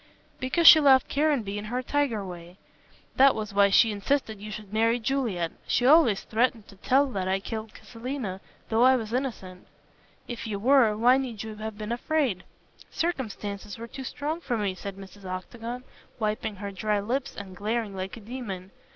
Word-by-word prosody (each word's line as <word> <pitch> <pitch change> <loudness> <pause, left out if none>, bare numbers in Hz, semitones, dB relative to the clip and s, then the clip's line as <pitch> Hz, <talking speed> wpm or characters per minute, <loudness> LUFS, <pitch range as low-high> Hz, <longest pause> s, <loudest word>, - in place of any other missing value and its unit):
"Because 265 +7 0
she 315 - +11
loved 270 -3 +5
Caranby 270 -9 0
in 205 - -7
her 250 +4 -3
tiger 255 -7 0
way. 175 0 -10 0.6
That 270 +1 +6
was 215 -1 -5
why 200 0 +5
she 220 +3 +5
insisted 215 0 -1
you 210 - -7
should 210 -1 -8
marry 230 +2 +3
Juliet. 225 -9 -1 0.2
She 245 - +1
always 275 -8 +5
threatened 230 -1 0
to 195 - -14
tell 270 +7 +3
that 190 -4 -2
I 190 - +1
had 195 0 -2
killed 220 -1 -5
Selina, 230 -5 -5 0.3
though 225 +1 +2
I 260 +1 +7
was 225 -3 -4
innocent." 220 -8 -4 0.6
"If 235 -1 -6
you 210 -2 -3
were, 235 -1 +4
why 245 +4 +5
need 240 -6 -4
you 220 -1 -8
have 215 0 -6
been 215 +1 -5
afraid?" 245 - 0 0.5
"Circumstances 210 - -4
were 230 - -7
too 265 +3 -8
strong 300 +5 -4
for 245 -7 -2
me," 205 -3 -1
said 195 +1 -7
Mrs. 195 +1 -12
Octagon, 230 +7 -6 0.3
wiping 215 -1 -2
her 200 +1 -6
dry 210 +2 -1
lips 250 +7 -3
and 195 -2 -8
glaring 215 +1 -2
like 190 +3 -5
a - - -11
demon. 200 -5 -7
220 Hz, 185 wpm, -27 LUFS, 200-255 Hz, 0.6 s, she